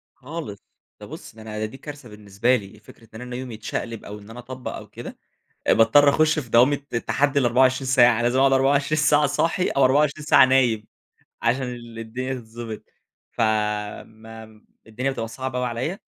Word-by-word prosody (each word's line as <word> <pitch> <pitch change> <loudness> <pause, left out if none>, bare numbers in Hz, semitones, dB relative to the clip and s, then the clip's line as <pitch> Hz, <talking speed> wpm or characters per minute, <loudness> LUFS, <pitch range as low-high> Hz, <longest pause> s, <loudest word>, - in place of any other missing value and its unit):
خالص، 145 -6 -7 0.4
ده - - -9
بُص - - -11
ده 110 - -13
أنا 110 0 -5
دي 110 - -11
كارثة 145 -2 -10
بالنسبة 105 +4 0
لي، 100 -1 -9
فكرة 115 +1 -18
إن - - -8
أنا 125 0 -6
يومي 125 -2 -6
يتشقلب 110 +1 -5
أو 105 +1 -8
إن 105 +1 -15
أنا 115 - -10
أطبق 125 +1 -7
أو - - -9
كده، - - -10 0.5
باضطر 130 +6 +5
أخش 155 +2 +2
في 135 -6 -4
دوامة 125 +6 +5 0.3
تحدي 145 0 +1
ال24 130 +1 +2
ساعة، 120 -3 +4
لازم 120 +2 +1
أقعد 135 0 +4
24 140 +3 +2
ساعة 150 0 +4
صاحي 165 +5 0
أو 140 - +2
24 145 +3 +2
ساعة 150 - +7
نايم، 125 -5 +2 0.6
عشان 125 +3 +1
ال 120 -2 -7
الدنيا 125 +4 -4
تتضبط. 115 -2 -8 0.5
فما 110 +1 -3
ام 110 -1 -19 0.2
الدنيا 125 +5 -2
بتبقى 115 -4 -4
صعبة 130 +3 -5
أوي 125 - -1
عليَّ، 125 - -3
125 Hz, 175 wpm, -23 LUFS, 110-135 Hz, 0.6 s, ساعة